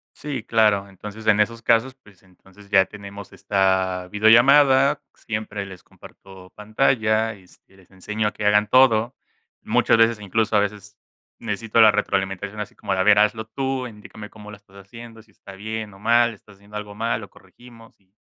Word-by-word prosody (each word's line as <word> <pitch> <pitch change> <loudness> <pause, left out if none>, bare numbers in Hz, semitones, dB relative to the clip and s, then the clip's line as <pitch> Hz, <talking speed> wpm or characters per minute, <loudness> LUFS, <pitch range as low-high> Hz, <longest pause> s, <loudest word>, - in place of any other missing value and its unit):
Sí, 140 -6 -6
claro. 105 -3 +2
Entonces 105 +3 -11
en 105 -1 +4
esos 115 +2 -1
casos, 120 +3 +1
pues 100 -9 -23
entonces 95 +2 -21
ya 95 -2 +5
tenemos 100 -1 -11
esta 95 -2 -1
videollamada. 130 +6 +5
Siempre 105 -2 -6
les 95 -2 -12
comparto 95 -1 -16
pantalla 110 0 0
y 95 -3 -19
este, 95 +1 -23
les 95 -2 -23
enseño 105 +3 -3
a - - -7
que 105 - -7
hagan 105 0 +3
todo. 120 -1 +3 0.5
Muchas - - +2
veces, 115 -1 +2
incluso 110 +2 -1
a - - +5
veces 105 0 -5 0.4
necesito 115 +1 -1
la 110 - +8
retroalimentación 100 0 -3
así 105 - -7
como 100 - -5
de: 95 - -1
"A - - +3
ver, 105 +1 +5
hazlo 105 +1 +1
tú 130 +2 -3
e - - -8
indícame 105 0 -12
cómo 105 -1 -13
lo 105 - -10
estás 100 -1 -23
haciendo. 115 +3 -13
Si 110 - -28
estás 100 -1 -14
bien 110 0 -6
o 95 - -16
mal. 115 +2 +3
Si - - -10
estás 100 0 -20
haciendo 100 +1 -14
algo 105 -1 -7
mal, 115 +2 -2
lo 100 - -11
corregimos", 115 +4 -18
y 95 -1 -38
105 Hz, 190 wpm, -22 LUFS, 100-115 Hz, 0.5 s, la